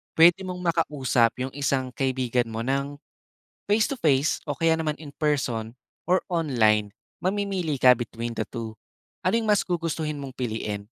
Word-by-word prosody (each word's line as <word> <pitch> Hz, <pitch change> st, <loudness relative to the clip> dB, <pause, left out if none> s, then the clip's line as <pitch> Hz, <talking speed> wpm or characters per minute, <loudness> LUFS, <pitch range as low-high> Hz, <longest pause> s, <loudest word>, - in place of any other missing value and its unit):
Pwede 170 Hz, +4 st, +6 dB
mong 180 Hz, 0 st, -5 dB
makausap 140 Hz, -9 st, +2 dB
yung 130 Hz, +1 st, -2 dB
isang 135 Hz, -2 st, 0 dB
kaibigan 130 Hz, -3 st, 0 dB
mo 110 Hz, -, -4 dB
ng 140 Hz, +3 st, -1 dB, 0.7 s
face-to-face 200 Hz, -, +2 dB
o 145 Hz, -, -2 dB
kaya 165 Hz, +1 st, +3 dB
naman 155 Hz, -2 st, -1 dB
in-person 140 Hz, -7 st, -2 dB, 0.4 s
or 185 Hz, +1 st, +4 dB
online, 110 Hz, -11 st, +2 dB, 0.3 s
mamimili 190 Hz, -5 st, -1 dB
ka 125 Hz, -, +8 dB
between 115 Hz, 0 st, -5 dB
the -, -, -1 dB
two. 115 Hz, -2 st, -6 dB, 0.5 s
Ano 190 Hz, -, +3 dB
yung 225 Hz, -, -3 dB
mas 210 Hz, -2 st, +3 dB
gugustuhin 160 Hz, -4 st, -2 dB
mong 135 Hz, -2 st, -7 dB
piliin? 110 Hz, -4 st, -3 dB
140 Hz, 140 wpm, -25 LUFS, 120-165 Hz, 0.7 s, ka